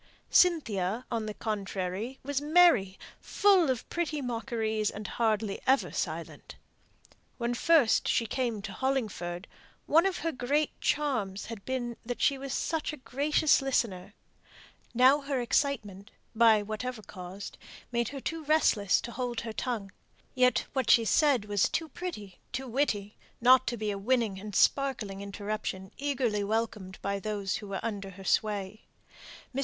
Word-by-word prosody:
Cynthia, 235 - +2
on 225 -2 -2
the 215 - -4
contrary, 200 +2 -3
was 285 0 -2
merry, 295 - +4 0.2
full 385 -7 +3
of 255 -3 -2
pretty 320 -3 -2
mockeries, 225 -4 -1
and 210 +1 -7
hardly 215 -3 -1
ever 265 +1 +3
silent. - - -5 0.8
When 235 0 -1
first 285 -2 +3
she 230 - +2
came 230 -2 -2
to 195 - -6
Hollingford 210 -8 -2 0.4
one 330 +5 +4
of 380 - -2
her 330 - +1
great 285 +3 0
charms 220 -10 -1
had 220 -3 -8
been 245 -3 -3
that 245 +1 -5
she 275 -1 +2
was 275 0 -6
such 320 +4 -1
a 305 - -8
gracious 290 +3 +2
listener; 215 -7 -1 0.8
now 260 +4 +6
her 275 -2 -2
excitement, 225 -6 -1 0.2
by 220 -2 +5
whatever 220 +2 -5
caused, 185 +1 -9 0.3
made 235 -2 0
her 275 - -6
too 325 +4 -4
restless 265 -10 +3
to 235 - -7
hold 240 -1 -3
her 225 -2 -6
tongue; 220 -5 -3 0.4
yet 250 0 +3
what 265 -1 -1
she 230 - +6
said 275 -3 +3
was 205 -2 +1
too 325 - -2
pretty, 265 - -7
too 265 +1 -4
witty, 225 -5 -1 0.2
not 255 +1 +6
to 240 0 -1
be 215 -1 -2
a 200 - -4
winning 220 -3 0
and 210 0 -8
sparkling 230 -8 +1
interruption, 200 -1 -5
eagerly 250 -7 0
welcomed 215 -3 -2
by 200 0 -1
those 200 -2 -2
who 210 - -9
were 195 -1 -3
under 205 -3 -4
her 195 0 -11
sway. 210 0 0 0.7
Mr. 265 - -2
230 Hz, 150 wpm, -29 LUFS, 205-270 Hz, 0.8 s, now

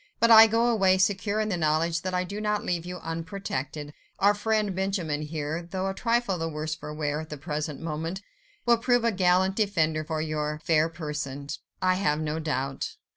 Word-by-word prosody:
But 230 0 +5
I 225 0 +11
go 225 +2 +2
away, 195 -5 +4
secure 200 +2 +1
in 215 0 0
the 185 - 0
knowledge 165 +1 +1
that 185 +1 -3
I 180 - +1
do 200 +4 -5
not 210 0 -1
leave 175 -1 -2
you 180 0 -5
unprotected. 165 -4 -4 0.2
Our 200 +1 +4
friend 210 -2 0
Benjamin 185 -6 -1
here, 155 +1 -3
though 185 +2 -4
a 195 - -1
trifle 230 -4 0
the 165 0 -2
worse 155 0 -3
for 150 0 -7
wear 150 0 -2
at 160 - -10
the 150 - -6
present 150 0 -4
moment, 165 +4 -4 0.4
will 235 -1 +4
prove 245 0 +2
a 230 - +3
gallant 185 0 +3
defender 160 -7 +1
of 155 -1 -1
your 150 0 -2
fair 160 0 +3
person, 145 -4 -5 0.3
I 185 0 +3
have 150 -6 +2
no 155 0 -2
doubt. 135 -3 -3
170 Hz, 195 wpm, -27 LUFS, 155-200 Hz, 0.4 s, I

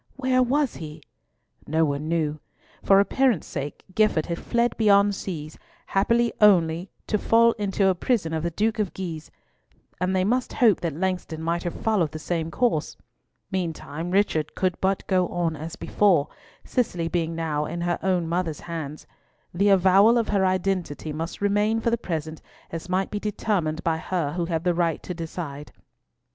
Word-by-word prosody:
Where 260 -1 +2
was 270 +2 +1
he? 155 -1 -9 0.6
No 160 +2 +2
one 145 +1 -2
knew. 155 -2 -1 0.4
For 195 0 +5
appearance 235 - +2
sake, 140 +1 -6
Gifford 215 -6 +2
had 170 0 -4
fled 235 0 0
beyond 205 -2 +4
seas, 160 -6 -6 0.3
happily 235 +4 +2
only 175 -3 +4 0.2
to 210 - 0
fall 230 +2 +4
into 200 -1 0
a 190 - +4
prison 180 -3 0
of 160 - -1
the 170 - -1
Duke 215 +6 -1
of 205 -4 -1
Guise: 165 -5 -6 0.7
and 185 +1 0
they 185 - +2
must 245 +5 0
hope 225 -6 +4
that 165 -4 -2
Langston 180 -2 -2
might 170 +1 0
have 175 - -4
followed 195 -9 0
the - - -4
same 165 0 -2
course. 200 -6 0 0.5
Meantime, 170 -3 -3
Richard 180 -5 +1
could 185 -2 0
but 190 0 0
go 185 -2 +2
on 170 -2 -1
as 155 +2 -7
before, 180 -8 +2 0.4
Cicely 180 -9 -1
being 165 -1 -1
now 155 -2 -1
in 170 - -4
her 175 0 -1
own 180 -3 +1
mother's 170 -2 -2
hands. 155 -3 -6 0.5
The 200 +4 +2
avowal 195 +4 +5
of 230 - 0
her 200 -2 +2
identity 185 -5 -1
must 165 +5 -5
remain 205 +2 +2
for 230 +1 0
the - - +3
present 160 -5 -4 0.3
as 165 +2 -6
might 185 +1 0
be 210 - -2
determined 190 -6 -1
by 165 -1 +1
her 160 -3 -2
who 175 -1 -1
had 165 -1 -2
the 180 -1 +2
right 170 -2 0
to 180 - -5
decide. 160 -3 -6
180 Hz, 175 wpm, -25 LUFS, 160-205 Hz, 0.7 s, For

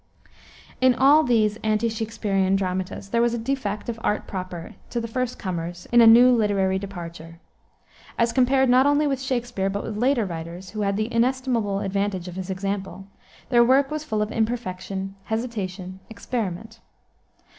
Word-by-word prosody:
In 255 -1 +5
all 280 +4 +6
these 220 -6 +2
ante 215 +1 0
Shaksperian 210 -4 0
dramatists 185 +1 -3
there 235 - +2
was 235 0 +2
a - - -2
defect 225 -4 -3
of 230 -1 -4
art 210 - 0
proper 180 -3 -6 0.2
to 240 - -2
the 230 - -4
first 250 +1 -3
comers 175 -1 -5
in 240 0 +6
a 230 - +8
new 240 +3 +8
literary 200 -5 +2
departure. 170 -4 -8 0.8
As 230 0 +2
compared 265 +1 +3
not 255 +2 +5
only 290 +1 +3
with 270 -3 -1
Shakspere, 245 -7 -2
but 200 +1 -3
with 220 - -5
later 245 -1 +2
writers, 170 +1 -7
who 215 0 -4
had 200 -1 0
the 215 +2 -2
inestimable 235 -4 0
advantage 195 -2 -2
of 180 - -7
his 190 0 -6
example, 195 0 -4 0.4
their 240 -2 +5
work 270 +3 +3
was 305 0 -3
full 215 -7 -1
of 210 - -5
imperfection, 195 -4 -3
hesitation, 195 -5 -4
experiment. 225 -1 -5
215 Hz, 165 wpm, -24 LUFS, 190-240 Hz, 0.8 s, a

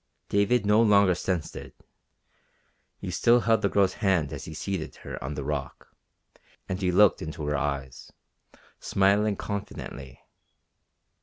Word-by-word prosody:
David 100 +3 +2
no 105 +2 +4
longer 100 -4 +5
sensed 90 -1 -3
it. - - -9 1.2
He - - -6
still 120 +1 +4
held 115 -1 +2
the 100 - +1
girl's 100 -1 +2
hand 90 -9 +1
as - - -7
he 80 - -8
seated 95 -1 -4
her - - -8
on 70 +2 -4
the 70 - -4
rock, 70 -2 -5 0.7
and 95 +1 -4
he 90 -1 +1
looked 100 +2 +4
into 80 -1 -5
her 75 0 -1
eyes, 70 -2 -4 0.7
smiling 100 +2 +2
confidently. 95 -11 -7
95 Hz, 140 wpm, -27 LUFS, 75-100 Hz, 1.2 s, longer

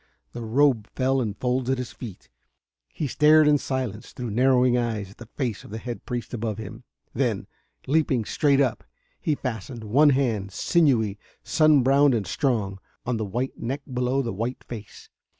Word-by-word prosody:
The 120 - -6
robe 115 -1 +2
fell 130 0 +1
in 105 -4 -2
folds 125 +2 -1
at 130 - +2
his 125 -1 -5
feet. 100 - -10 0.6
He 155 - -4
stared 150 +3 +5
in 145 -1 +5
silence, 125 -5 -4
through 120 -3 -5
narrowing 125 +1 +4
eyes, 110 -5 -2
at - - -18
the 120 - -10
face 120 -4 -3
of - - -13
the 110 - -5
head 120 +1 -7
priest 120 -1 -4
above 110 -3 -2
him. 110 -3 -8 0.3
Then, - - 0 0.4
leaping 135 -5 +1
straight 140 +2 +2
up, 130 -5 +1 0.4
he 155 - 0
fastened 115 -2 -5
one 135 +8 +5
hand, 115 -8 0
sinewy, 115 - +2 0.2
sun 155 -4 +4
browned 140 0 +4
and 105 -4 -1
strong, 100 - -1 0.3
on 120 -1 0
the 110 - -2
white 120 +7 -3
neck 135 +4 -3
below 125 +2 +1
the 115 - -3
white 115 +6 -4
face. 110 -4 -10
125 Hz, 175 wpm, -25 LUFS, 110-135 Hz, 0.6 s, stared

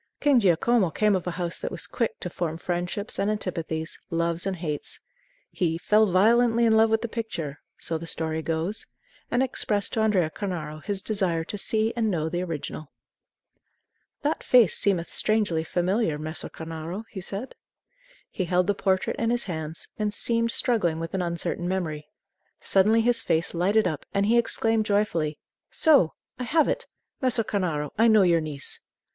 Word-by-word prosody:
King 285 -4 +4
Giacomo 200 +1 +3
came 210 +4 +2
of 185 -1 -3
a 180 - -3
house 175 -1 -2
that - - -3
was - - -4
quick 230 -3 -2
to 180 - -3
form 165 -2 -3
friendships 180 +4 -3
and 200 - +1
antipathies, 165 -6 -3
loves 170 +2 -1
and 195 - -1
hates. 155 -4 -3 0.5
He 165 -3 0
"fell 215 +5 +3
violently 230 +5 +4
in 220 -1 +4
love 220 0 +5
with 220 +1 +1
the - - -1
picture," 205 -11 -5 0.2
so 165 -1 -2
the 165 - -7
story 160 -1 -1
goes, 165 +6 -2 0.4
and 245 +2 +2
expressed 210 -5 0
to - - 0
Andrea 190 -7 +2
Cornaro 155 -7 -5
his 200 -1 -2
desire 185 -6 0
to 185 - -6
see 220 +2 0
and 225 -2 +1
know 160 -4 -1
the 175 +2 -2
original. 155 -3 -5 1.3
"That 295 +2 0
face 240 -8 +5
seemeth 180 -4 0
strangely 205 -7 +1
familiar, 175 0 0
Messer 155 +2 -5
Cornaro," 165 +5 -6
he 190 - -6
said. 200 +7 -6 0.8
He 185 - -2
held 180 +1 +2
the 205 - +2
portrait 190 -1 0
in 230 - 0
his 240 0 +2
hands, 160 -3 -4
and 210 -1 0
seemed 230 0 +2
struggling 230 - +2
with 165 +2 -5
an 190 - 0
uncertain 175 0 -2
memory. 160 -5 -3 0.5
Suddenly 215 +4 +3
his 235 0 +3
face 165 -4 0
lighted 190 +4 +2
up, 155 -5 -4
and 200 0 +3
he 235 +3 +4
exclaimed 225 -1 +1
joyfully: 170 -7 0 0.3
"So; 280 - +4 0.2
I - - -2
have 305 +4 +3
it! - - -2 0.3
Messer 250 -3 +1
Cornaro, 165 -9 -2
I 230 - +6
know 215 -3 +6
your 170 -2 +3
niece." 150 -3 -4
190 Hz, 175 wpm, -26 LUFS, 165-220 Hz, 1.3 s, I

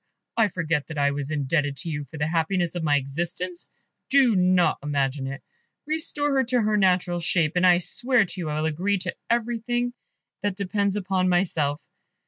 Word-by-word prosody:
I 225 -2 +4
forget 165 -5 -1
that 160 - -7
I 140 0 +2
was 140 0 -4
indebted 145 -1 0
to 165 - -5
you 145 -1 -4
for 155 - -11
the 150 - 0
happiness 170 +2 0
of 175 - -3
my 150 -2 +2
existence? 170 +6 -4 0.4
Do 265 -5 +5
not 180 -1 +3
imagine 140 -1 -1
it. 135 +1 -6 0.4
Restore 295 -2 -1
her 265 - +4
to 250 +1 +1
her 210 0 +2
natural 185 -3 +2
shape, 165 -2 +1
and 180 +1 +4
I 175 -1 +6
swear 240 +5 +2
to 180 0 -7
you 160 - -3
I 150 0 -2
will - - 0
agree 180 +6 0
to 185 - -4
everything 240 +1 0 0.5
that 205 -2 -2
depends 200 0 0
upon 190 -2 0
myself. 160 -5 0
180 Hz, 185 wpm, -25 LUFS, 150-205 Hz, 0.5 s, I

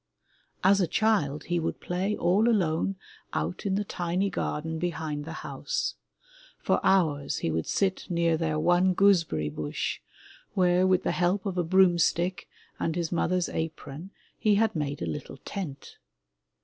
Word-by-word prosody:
As 195 +1 +5
a 180 - +2
child 160 -8 +1
he 175 0 -1
would 165 - -3
play 190 +4 -2
all 195 +7 +3
alone 185 -3 +1 0.4
out 80 - -2
in 190 - +1
the 205 - 0
tiny 180 +1 -1
garden 160 -1 -3
be 175 +1 0
hind 155 -3 -4
the 165 - -6
house. - - -2 0.6
For - - +1
hours 150 -7 +2
he 80 - +1
would 80 0 -2
sit 190 -1 0
near 170 -2 +2
their 155 -1 -1
one 175 +3 +3
gooseberry 165 - +3
bush 75 0 -3 0.6
where, 180 -1 +4
with 185 -1 +3
the - - +1
help 180 +3 +1
of 195 -3 -2
a 180 - +1
broomstick 175 0 +2 0.3
and 165 - -1
his 170 -2 -2
mother's 180 +1 +1
apron, 160 +1 -5 0.3
he 210 -1 +3
had 220 0 +2
made 145 - -2
a - - -1
little 80 -2 -5
tent. 150 -9 -6
175 Hz, 160 wpm, -28 LUFS, 155-190 Hz, 0.6 s, As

